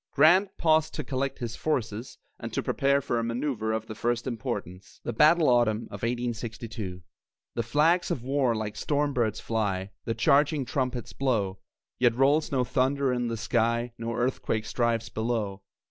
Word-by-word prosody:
Grant 175 +7 +5
paused 160 -1 +2
to 155 - -3
collect 135 +1 -2
his 120 -2 -4
forces 115 -6 -2 0.2
and - - -6
to - - -1
prepare 140 0 +2
for 120 -3 -1
a - - -1
manoeuvre 115 -1 -2
of 110 0 -1
the 110 - -7
first 120 +2 -1
importance. 115 -6 -5
THE 120 - -3
BATTLE 155 +6 +5
AUTUMN 120 -3 +4
OF - - -7
1862 115 -5 -4 0.5
The 115 - -1
flags 155 +9 +2
of 120 - -2
war 130 -2 +1
like 110 -1 -3
storm 145 -1 0
birds 110 -4 0
fly, 100 -4 -2
The 115 - -1
charging 140 +5 +3
trumpets 125 -2 -2
blow; 105 -8 0 0.4
Yet 120 -2 +4
rolls 140 +4 +3
no 130 -2 +2
thunder 135 +1 +1
in 120 -1 -1
the 115 -1 -2
sky, 115 +1 0
No 115 0 -3
earthquake 120 -3 -1
strives 115 -2 0
below. 110 -3 -2
120 Hz, 165 wpm, -27 LUFS, 110-135 Hz, 0.5 s, Grant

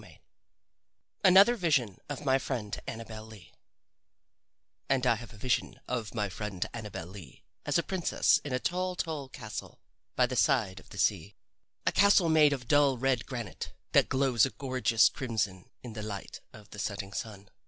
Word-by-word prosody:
XVIII - - -16 1.1
ANOTHER 195 +6 +7
VISION 145 - +1
OF 145 0 -5
MY 135 0 +3
FRIEND 115 -6 -4
ANNABEL 110 -1 -7
LEE 110 -6 -14 1.4
And 135 -1 +2
I 125 - +5
have 115 0 -8
a 110 - -14
vision 125 +3 -1
of 120 -3 -3
my 105 -2 0
friend 95 -1 -4
Annabel 105 -7 -6
Lee 90 -7 -12 0.2
as - - +2
a 170 - +1
princess 185 -1 +2
in 145 - -7
a 125 - +1
tall, 180 +4 -1
tall 155 -6 -4
castle 110 -4 -8 0.4
by 125 - +4
the 125 +1 -4
side 105 -7 +2
of - - -19
the 100 - -11
sea 100 -1 0 0.5
a - - +3
castle 200 -4 +5
made 155 -2 +6
of 130 -4 -3
dull 145 -3 +4
red 130 -1 0
granite 120 -7 -6 0.2
that - - +4
glows 130 -4 +3
a 135 - +4
gorgeous 130 -5 +2
crimson 105 -7 -3
in 120 -3 -8
the 110 - -6
light 105 -3 -7
of 105 -1 -15
the 105 - -9
setting 100 -1 -4
sun. 100 -3 -7
120 Hz, 175 wpm, -30 LUFS, 105-135 Hz, 1.4 s, ANOTHER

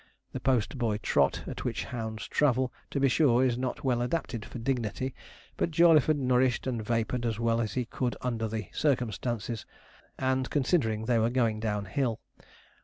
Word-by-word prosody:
The - - -4
post 130 0 0
boy 110 -4 +1
trot 70 -9 +1
at - - -6
which - - -2
hounds 110 -2 -5
travel, 130 -3 +2 0.2
to 140 - -2
be 135 - +4
sure, 130 -2 +4
is 125 -2 +2
not 125 0 -3
well 125 -3 +1
adapted 125 -4 -2
for 125 - -8
dignity; 125 +1 -2 0.4
but - - +1
Jawleyford 155 -2 +5
nourished 125 -2 +2
and 120 -4 -2
vapoured 115 +2 -1
as 115 -2 -1
well 115 0 +2
as 110 - -2
he 125 -1 0
could 120 +2 -2
under 115 -3 -1
the 110 -1 -4
circumstances, 120 -4 -1 0.5
and 130 -1 0
considering 125 -7 +1
they 115 0 +2
were 110 +1 +2
going 115 -3 +1
down 105 -2 -2
hill. 115 +3 -1
120 Hz, 175 wpm, -29 LUFS, 110-130 Hz, 0.5 s, Jawleyford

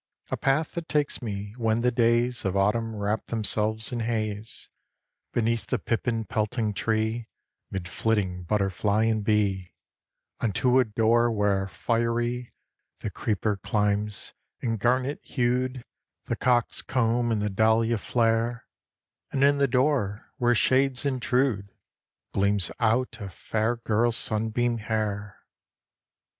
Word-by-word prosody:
A - - +1
path 150 +4 +1
that 170 -1 -6
takes 150 -2 0
me, 105 -3 -5
when 115 -1 +1
the 125 +1 +2
days 120 0 +2
Of 95 0 0
autumn 110 +3 +1
wrap 105 +1 -2
themselves 110 +1 +1
in 120 - -2
haze, 110 -1 -3 0.6
Beneath 115 0 0
the 125 - 0
pippin 115 +1 -1
pelting 110 0 -1
tree, 110 +2 -1 0.4
'Mid 95 -2 -4
flitting 95 -3 -1
butterfly 100 +2 +1
and 110 -2 +1
bee; 100 -4 0 0.6
Unto 125 +4 +2
a 130 - +4
door 115 +2 +2
where, 100 -3 +1
fiery, 120 +5 -1 0.5
The - - -3
creeper 105 -1 -1
climbs; 105 +1 -1 0.3
and, 115 -3 -2
garnet 130 +6 +1
hued, 125 0 -1 0.4
The - - -1
cock's 120 -2 +1
comb 120 -1 +1
and 110 - +1
the 105 0 -1
dahlia 110 +2 +2
flare, 115 +2 0 0.7
And 135 - +1
in 140 0 +4
the 140 - +4
door, 125 -6 0
where 120 -1 +3
shades 130 +3 +2
intrude, 125 -6 0 0.6
Gleams 100 -2 +2
out 115 +1 +1
a 100 - -5
fair 110 +5 -1
girl's 115 0 +1
sunbeam 115 +2 0
hair. 105 -2 -3
115 Hz, 125 wpm, -26 LUFS, 105-120 Hz, 0.7 s, a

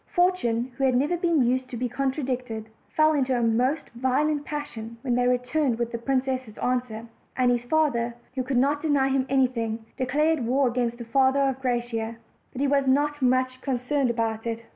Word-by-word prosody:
Fortune, 260 -10 +1
who 270 - -2
had 260 -2 +3
never 290 +7 +2
been 335 -5 +2
used 255 +1 0
to 245 - -5
be 250 +2 -1
contradicted, 255 -4 -3 0.3
fell 310 0 +5
into 265 -3 +1
a 240 - 0
most 250 +7 +1
violent 285 +5 0
passion 235 -7 -6
when 250 -3 0
they 245 0 +2
returned 250 +1 +1
with 235 0 -2
the 235 - -4
princess' 260 -2 -2
answer; 245 -3 -2 0.3
and 250 -1 +3
his 240 0 0
father, 245 -5 +1 0.2
who 260 - -1
could 255 0 -1
not 285 +3 +2
deny 285 -4 +2
him 265 -1 +1
anything, 235 -4 0
declared 300 +5 +1
war 265 +2 +3
against 240 -1 -1
the 240 - -7
father 265 +3 +3
of 265 -1 0
Gra 250 -2 +1
ciosa. 230 -1 -4 0.4
But 260 - -5
he 285 - +2
was 275 -1 +2
not 290 +2 +2
much 255 0 +1
concerned 265 +1 0
about 225 -1 -1
it. 230 0 -4
255 Hz, 190 wpm, -25 LUFS, 240-275 Hz, 0.4 s, fell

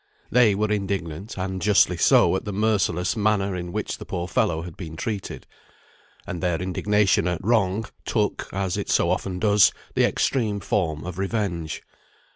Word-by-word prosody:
They 115 -5 +5
were 105 +1 0
indignant, 95 -2 -3
and 95 0 -3
justly 100 -3 +4
so, 85 - +4
at - - -2
the 105 - -4
merciless 100 -4 +1
manner 100 -3 +1
in 90 -1 -5
which - - -3
the - - -6
poor 90 -1 -4
fellow 80 -2 0
had 85 -2 -9
been 80 -4 -8
treated; 100 +2 -5 0.8
and 90 - -5
their 90 -3 0
indignation 95 0 +1
at 90 +1 -3
wrong, 110 -2 +2 0.2
took - - -1
(as 95 -1 -2
it - - -4
so 85 - +3
often 95 0 -2
does) 105 +1 +5 0.2
the - - +3
extreme 110 -6 0
form 80 -8 -1
of 90 0 -6
revenge. 95 -6 -2
95 Hz, 165 wpm, -24 LUFS, 90-105 Hz, 0.8 s, They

